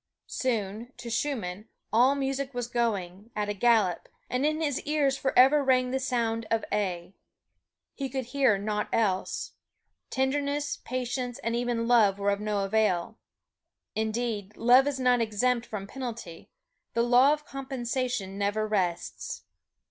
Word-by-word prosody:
Soon, 230 -1 -2
to 235 - -7
Schumann, 220 -6 -2 0.2
all 250 +5 +5
music 275 -1 -2
was 245 -1 -1
going 215 -4 -2
at 210 -1 -1
a - - 0
gallop, 205 -4 +2 0.2
and 255 +4 +1
in 310 +1 0
his 290 -4 -1
ears 295 -3 +1
forever 270 +2 +4
rang 255 -1 +3
the 265 - 0
sound 230 -3 -1
of 225 -1 0
A. 185 -3 -2 0.8
He 275 -2 -4
could 260 0 -3
hear 255 -4 +2
naught 210 +1 -2
else. 195 -4 0 0.6
Tenderness, 285 +2 -1
patience, 250 -1 -3
and 230 +1 0
even 240 -1 -1
love 215 -5 +5
were 200 0 +1
of 200 - -1
no 210 -1 -1
avail. 215 -1 0 0.7
Indeed, 220 -2 -2
love 250 +4 +6
is 280 -2 -1
not 250 -2 +3
exempt 230 +2 +1
from 205 -3 -5
penalty 230 -8 -7 0.5
the 235 - +3
law 250 +4 +6
of 300 0 -1
compensation 250 -7 -3
never 205 +2 0
rests. 185 -5 -2
235 Hz, 140 wpm, -28 LUFS, 210-260 Hz, 0.8 s, love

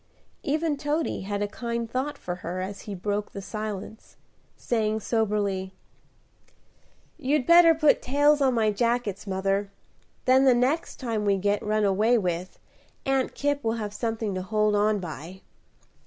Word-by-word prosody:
Even 305 +1 0
Toady 295 +2 -1
had 205 0 -2
a - - -1
kind 235 +2 -4
thought 265 +5 -3
for 180 -7 -5
her, 180 +1 -5
as 195 +2 -5
he 200 - -4
broke 205 +3 -3
the - - -5
silence, 215 +1 -6 0.4
saying 220 -2 0
soberly, 205 -4 -1 1.4
"You'd 285 -1 +1
better 340 0 +7
put 305 -2 +4
tails 290 +3 +3
on 260 -2 +3
my 220 -2 +2
jackets, 230 -2 -1
mother; 195 +1 0 0.6
then 260 +1 +5
the 255 -2 +6
next 265 +7 0
time 230 -5 -2
we 200 -1 +2
get 205 +2 0
run 215 0 0
away 210 +5 +3
with, 180 -3 -3 0.5
Aunt 270 -1 0
Kipp 285 0 -1
will 225 - +1
have 210 -3 -4
something 225 -2 -2
to 185 - -3
hold 210 +2 +1
on 210 +1 +2
by." 175 +2 -8
215 Hz, 155 wpm, -26 LUFS, 200-260 Hz, 1.4 s, better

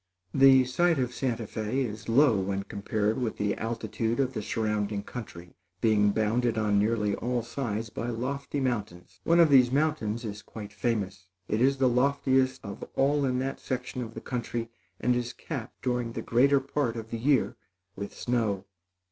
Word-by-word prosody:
The 135 -1 +7
site 165 +6 +2
of 125 -2 -1
Santa 120 -4 -1
Fé 110 +5 -2
is 110 0 -7
low 120 -3 +5
when 95 +1 -2
compared 105 +2 -1
with 115 -3 -2
the 105 -1 0
altitude 115 +1 -2
of 130 -1 +1
the 110 - -3
surrounding 105 -2 -1
country, 90 -8 -9 0.3
being 105 -1 +4
bounded 110 +3 +1
on 105 -2 +2
nearly 105 -1 +1
all 120 +2 -1
sides 115 -3 -3
by 115 - -4
lofty 140 +5 -3
mountains. 105 -9 -3
One 170 +1 +4
of 165 -3 +6
these 125 -3 +6
mountains 130 -6 0
is 105 -1 -5
quite 105 0 -9
famous. 100 -3 -2 0.2
It 110 +2 0
is 135 +2 +4
the 130 -1 +3
loftiest 130 0 +2
of 100 - -7
all 140 +1 +2
in 125 -1 0
that 135 - -4
section 125 -1 -4
of 115 -2 -7
country, 120 -2 -3 0.3
and 125 0 +2
is 120 0 -2
capped 125 -3 -7
during 125 -2 -1
the - - -4
greater 135 +4 +4
part 135 -3 -1
of 115 -1 -7
the 115 - -3
year 135 +1 +2 0.4
with 100 +1 -5
snow. 110 -6 0
115 Hz, 175 wpm, -28 LUFS, 105-130 Hz, 0.4 s, The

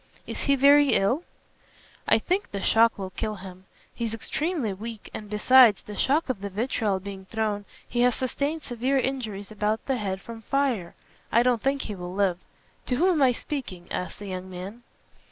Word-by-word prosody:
"Is - - -6
he 280 - +4
very 285 +1 +6
ill?" 240 +11 +2 0.9
"I - - +6
think 375 +3 -1
the 200 - -4
shock 230 +1 +4
will 190 -2 -5
kill 215 +2 -3
him. 185 -1 -11 0.3
He 235 - -5
is 225 0 -3
extremely 295 - -2
weak, 220 +2 -8
and 210 -1 -7
besides 225 +1 +6
the 210 - -8
shock 295 +9 +2
of 250 -7 -3
the 200 - -4
vitriol 210 -1 -1
being 195 0 -8
thrown, 210 -1 -2 0.2
he 240 - 0
has 245 -1 +4
sustained 285 +5 -2
severe 250 +3 0
injuries 225 -7 -3
about 215 +1 -1
the 265 -2 0
head 195 -4 -2
from 225 +2 -9
fire. 245 -8 -1 0.4
I 235 - +5
don't 245 -3 +2
think 275 +1 0
he 210 - -5
will 180 -1 -7
live. 190 -3 +1 0.5
To 250 - +1
whom 350 +9 +3
am 320 -5 +1
I 260 -2 +6
speaking?" 230 -9 -6
asked 180 -2 -4
the 205 - -9
young 185 0 -5
man. 190 +6 -8
225 Hz, 190 wpm, -26 LUFS, 200-265 Hz, 0.9 s, very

